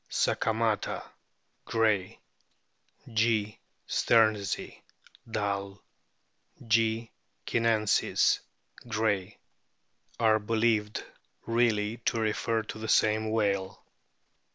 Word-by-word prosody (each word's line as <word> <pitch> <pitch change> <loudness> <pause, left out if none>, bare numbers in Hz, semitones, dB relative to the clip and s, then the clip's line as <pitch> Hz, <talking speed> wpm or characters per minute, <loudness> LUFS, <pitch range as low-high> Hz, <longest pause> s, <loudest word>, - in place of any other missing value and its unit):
sakamata, 110 -2 0 0.6
Gray; 110 -5 0 1.0
G. 110 -1 +1 0.3
stearnsi, 110 -4 +1 0.5
Dall; 100 -2 -3 0.9
G. 115 0 +1 0.3
c/iinensis, 115 -3 +2 0.5
Gray, 110 -3 -1 0.8
are 110 -1 +4
believed 110 -1 0 0.4
really 115 -2 +1
to 115 - +1
refer 110 +1 0
to 110 - -8
the 110 - -5
same 110 0 +3
whale. 100 -3 -1
110 Hz, 70 wpm, -29 LUFS, 105-115 Hz, 1.0 s, are